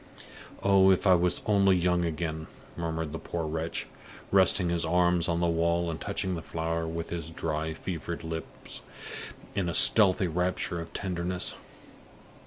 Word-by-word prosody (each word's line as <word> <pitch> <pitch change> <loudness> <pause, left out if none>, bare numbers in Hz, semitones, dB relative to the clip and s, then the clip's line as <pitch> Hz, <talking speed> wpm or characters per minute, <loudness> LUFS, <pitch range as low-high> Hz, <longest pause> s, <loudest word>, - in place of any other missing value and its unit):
"Oh, 95 -1 +5
if 95 0 +3
I 95 - +6
was 90 0 +2
only 100 -3 +4
young 90 0 +1
again!" 80 -1 -3 0.3
murmured 80 -2 -3
the 80 - -4
poor 85 -2 -4
wretch, 80 +1 -3 0.5
resting 95 -2 +4
his 85 -1 0
arms 85 0 +2
on 85 0 0
the - - +2
wall 85 +1 +1
and 80 - -7
touching 100 -2 -2
the 85 - -4
flower 80 0 -3
with 85 0 -5
his 85 -2 -4
dry, 80 -1 -3
fevered 80 -3 -5
lips 80 0 -7 0.7
in 95 -3 -1
a 85 - -3
stealthy 100 -2 +6
rapture 90 0 -1
of 85 - -9
tenderness. 90 -1 -2
85 Hz, 155 wpm, -28 LUFS, 80-90 Hz, 0.7 s, I